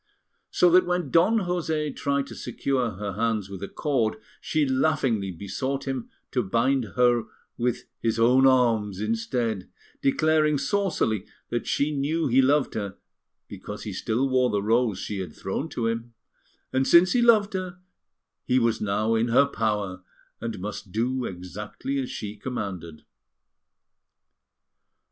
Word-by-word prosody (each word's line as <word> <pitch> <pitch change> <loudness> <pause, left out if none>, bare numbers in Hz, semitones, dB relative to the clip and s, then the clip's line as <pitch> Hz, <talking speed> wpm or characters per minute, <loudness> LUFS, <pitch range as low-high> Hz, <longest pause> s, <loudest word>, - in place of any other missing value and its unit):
So 180 - +4
that 180 +1 +5
when 180 -6 -1
Don 180 +7 +4
José 160 -5 -1
tried 140 -1 0
to - - -10
secure 130 -5 -1
her 100 +1 -5
hands 110 -2 -1
with 95 -2 -7
a 100 - -4
cord, 125 -7 0 0.3
she 155 -2 +1
laughingly 130 -7 +1
besought 100 +10 -4
him 130 -3 -3 0.2
to 125 - +1
bind 115 +1 0
her 120 -2 +3 0.3
with 120 0 -1 0.2
his 115 -1 0
own 125 +4 +5
arms 115 -7 +2
instead, 115 -1 -2 0.3
declaring 155 +1 +3
saucily 140 - 0 0.2
that 120 - -2
she 145 +2 +1
knew 155 +4 0
he 130 0 +4
loved 140 +2 +2
her 100 -2 -4 0.5
because - - -8
he - - -5
still 120 +5 0
wore 130 -1 +2
the 100 -2 0
rose 115 -1 +2
she 100 +1 -4
had 90 -5 -6
thrown 135 +11 -3
to 120 - -3
him, 115 +1 -3 0.6
and 130 0 +2
since 175 +1 +6
he 245 - +3
loved 220 -4 +5
her 185 -1 -4 0.7
he 125 - +2
was 115 -3 +1
now 105 +2 +1
in 115 +1 +2
her 120 +4 +5
power, 105 -7 -2 0.4
and 115 -1 -4
must 105 0 -6
do 125 +4 -1
exactly 105 +9 -5
as 130 - -3
she 105 0 -5
commanded. 95 -9 -6
120 Hz, 150 wpm, -26 LUFS, 105-140 Hz, 0.7 s, since